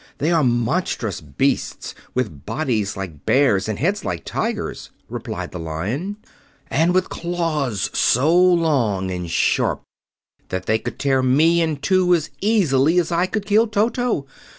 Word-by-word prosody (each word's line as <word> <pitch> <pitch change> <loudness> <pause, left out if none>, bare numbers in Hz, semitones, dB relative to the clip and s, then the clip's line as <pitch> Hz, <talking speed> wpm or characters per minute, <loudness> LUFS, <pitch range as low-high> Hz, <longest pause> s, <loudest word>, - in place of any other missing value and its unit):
"They 155 +4 0
are 165 -3 +3
monstrous 120 - 0
beasts 70 -3 -2 0.2
with 105 - -2
bodies 110 -10 -2
like 85 -7 -7
bears 110 - +2
and 110 - -2
heads 195 +7 0
like 85 -3 -4
tigers," - - -3 0.2
replied - - -5
the 90 - -6
Lion, 105 - -4 0.5
"and 170 +3 +2
with 185 0 +2
claws 155 - -2
so 145 +8 +3
long 150 - +2
and 90 -2 -4
sharp - - +1 0.7
that 95 - -3
they 110 0 +1
could 120 - -6
tear 135 -2 +1
me 155 +7 +4
in 160 -3 0
two 180 +4 +3
as 160 -3 -3
easily 170 -8 +3
as 175 -1 +1
I 175 +2 +2
could 210 +1 -3
kill 215 +3 +3
Toto. 220 - 0
145 Hz, 150 wpm, -21 LUFS, 110-175 Hz, 0.7 s, me